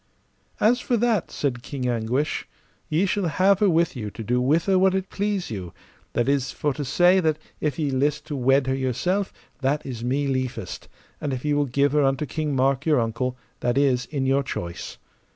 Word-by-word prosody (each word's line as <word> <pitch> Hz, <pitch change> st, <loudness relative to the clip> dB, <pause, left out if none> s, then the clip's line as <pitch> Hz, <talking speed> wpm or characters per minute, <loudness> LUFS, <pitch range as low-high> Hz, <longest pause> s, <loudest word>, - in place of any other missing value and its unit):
As 240 Hz, +4 st, +4 dB
for 245 Hz, -1 st, 0 dB
that, 225 Hz, -5 st, +1 dB
said 125 Hz, -4 st, -2 dB
King 130 Hz, -1 st, -4 dB
Anguish, 120 Hz, +5 st, -1 dB, 0.4 s
ye 160 Hz, +5 st, +2 dB
shall 200 Hz, -1 st, 0 dB
have 185 Hz, +5 st, +3 dB
her 205 Hz, -, +4 dB
with 170 Hz, -2 st, +2 dB
you 110 Hz, -4 st, -4 dB
to 115 Hz, -, -8 dB
do 125 Hz, +3 st, +1 dB
with 155 Hz, +6 st, +2 dB
her 190 Hz, -2 st, +3 dB
what 190 Hz, 0 st, +4 dB
it 190 Hz, 0 st, -2 dB
please 200 Hz, -, -1 dB
you; 95 Hz, -5 st, -6 dB, 0.4 s
that 120 Hz, -, +1 dB
is 140 Hz, -2 st, +1 dB
for 145 Hz, -2 st, -1 dB
to 145 Hz, -, -4 dB
say 175 Hz, +7 st, +4 dB
if 185 Hz, -, +2 dB
that 155 Hz, -1 st, +2 dB, 0.4 s
ye 150 Hz, -3 st, 0 dB
list 145 Hz, +3 st, 0 dB
to 150 Hz, -, -4 dB
wed 135 Hz, +1 st, +3 dB
her 130 Hz, -, 0 dB
yourself, 135 Hz, -, 0 dB, 0.3 s
that 140 Hz, +2 st, 0 dB
is 120 Hz, -4 st, -5 dB
me 135 Hz, +4 st, 0 dB
liefest, 130 Hz, -7 st, -3 dB, 0.3 s
and 145 Hz, -2 st, -2 dB
if 130 Hz, +2 st, -4 dB
ye 150 Hz, -, +2 dB
will 145 Hz, 0 st, +2 dB
give 140 Hz, +3 st, +2 dB
her 150 Hz, 0 st, +3 dB
unto 135 Hz, +2 st, +1 dB
King 150 Hz, -1 st, -2 dB
Mark, 135 Hz, +1 st, +2 dB
your 155 Hz, -4 st, +3 dB
uncle, 120 Hz, +2 st, -1 dB, 0.2 s
that 120 Hz, +2 st, 0 dB
is 130 Hz, -4 st, +2 dB
in 140 Hz, -3 st, -2 dB
your 135 Hz, +1 st, +3 dB
choice. 85 Hz, -10 st, -5 dB
140 Hz, 205 wpm, -24 LUFS, 125-165 Hz, 0.4 s, As